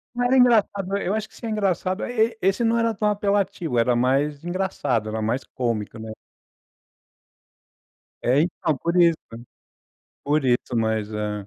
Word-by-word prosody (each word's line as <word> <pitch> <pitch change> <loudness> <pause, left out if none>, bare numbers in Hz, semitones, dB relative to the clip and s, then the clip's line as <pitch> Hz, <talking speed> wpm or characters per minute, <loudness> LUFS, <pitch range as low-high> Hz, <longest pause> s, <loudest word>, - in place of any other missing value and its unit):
Era 245 +1 +2
engraçado. 200 -6 +3
Eu 200 -1 -2
acho 215 0 -2
que - - -22
isso - - -9
é - - -3
engraçado 190 -2 -1
é - - -4 0.2
e 230 -1 -13
esse 195 +5 +1
não 230 0 +2
era 230 -1 +1
tão 210 0 -1
apelativo. 200 -8 -1
Era 120 +1 +3
mais 140 +4 +1
engraçado, 175 - -1
era 110 +1 -3
mais 115 +5 -1
cômico, 115 -3 -3
né. 110 0 -7 2.1
É, 130 +4 +3
então, 160 -2 -1
por 170 +5 -2
isso, 170 -2 +5
né. 115 +1 -9 0.8
Por 145 0 +1
isso, 125 -1 0
mas 110 -2 -1
é 105 -1 -4
165 Hz, 160 wpm, -23 LUFS, -, 2.1 s, isso